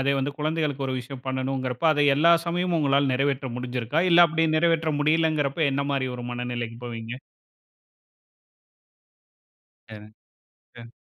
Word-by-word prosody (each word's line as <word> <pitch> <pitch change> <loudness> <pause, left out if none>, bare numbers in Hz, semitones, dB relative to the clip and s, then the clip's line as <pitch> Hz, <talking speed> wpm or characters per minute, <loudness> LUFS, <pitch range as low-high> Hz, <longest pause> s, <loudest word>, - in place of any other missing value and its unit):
அதே 140 +1 +1
வந்து 140 +2 -2
குழந்தைகளுக்கு 150 -3 -2
ஒரு 130 - -2
விஷயம் 130 +1 -10
பண்ணனும்ங்கிறப்ப, 130 +1 -3
அதை 145 -1 +1
எல்லா 170 +4 +5
சமயமும் 175 0 0
உங்களால 140 -1 +2
நிறைவேற்ற 135 0 -1
முடிந்திருதா? 125 +3 -2
இல்ல, 170 0 +7
அப்படி 165 +1 0
நிறைவேற்ற 165 -1 +1
முடியவில்லைங்கிறப்போ 155 -1 +1
என்ன 140 +1 -1
மாரி 130 -1 -1
ஒரு 120 - -7
மனநிலைக்கு 120 -1 -5
போவீங்க? 120 +2 -7 2.7
சரி. 105 -1 -11 0.7
அ. 115 0 -12
140 Hz, 125 wpm, -25 LUFS, 125-155 Hz, 2.7 s, இல்ல